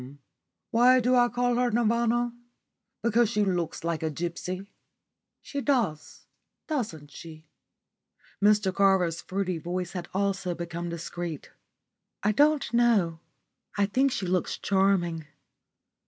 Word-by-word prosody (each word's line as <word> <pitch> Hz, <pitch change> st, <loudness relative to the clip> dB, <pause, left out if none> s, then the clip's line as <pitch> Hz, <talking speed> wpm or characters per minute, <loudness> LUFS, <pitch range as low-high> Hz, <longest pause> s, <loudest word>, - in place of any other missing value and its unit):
"Why 250 Hz, +2 st, +5 dB
do 250 Hz, +1 st, +2 dB
I 245 Hz, -1 st, +4 dB
call 245 Hz, 0 st, 0 dB
her 250 Hz, 0 st, +2 dB
Nirvana? 235 Hz, +1 st, +1 dB, 0.7 s
Because 235 Hz, -1 st, +3 dB
she 210 Hz, -3 st, +1 dB
looks 175 Hz, -5 st, -2 dB
like 165 Hz, -1 st, -2 dB
a 160 Hz, -, -1 dB
gipsy. 175 Hz, +4 st, -4 dB, 0.8 s
She 280 Hz, -, -4 dB
does, 225 Hz, -, -1 dB, 0.4 s
doesn't 185 Hz, -, -4 dB
she?" 160 Hz, +1 st, -11 dB, 1.0 s
Mr 205 Hz, -2 st, +3 dB
Carver's 185 Hz, -4 st, +2 dB
fruity 185 Hz, -3 st, -2 dB
voice 175 Hz, +2 st, -4 dB
had 180 Hz, -2 st, -6 dB
also 195 Hz, -2 st, -1 dB
become 170 Hz, 0 st, -5 dB
discreet. 170 Hz, -1 st, -6 dB, 0.7 s
"I 210 Hz, -, +3 dB
don't 290 Hz, +2 st, +2 dB
know. 215 Hz, -9 st, +3 dB, 0.6 s
I 200 Hz, -, +3 dB
think 265 Hz, +7 st, +1 dB
she 200 Hz, -, -2 dB
looks 180 Hz, 0 st, -1 dB
charming." 185 Hz, -5 st, +1 dB
195 Hz, 120 wpm, -27 LUFS, 170-235 Hz, 1.0 s, Why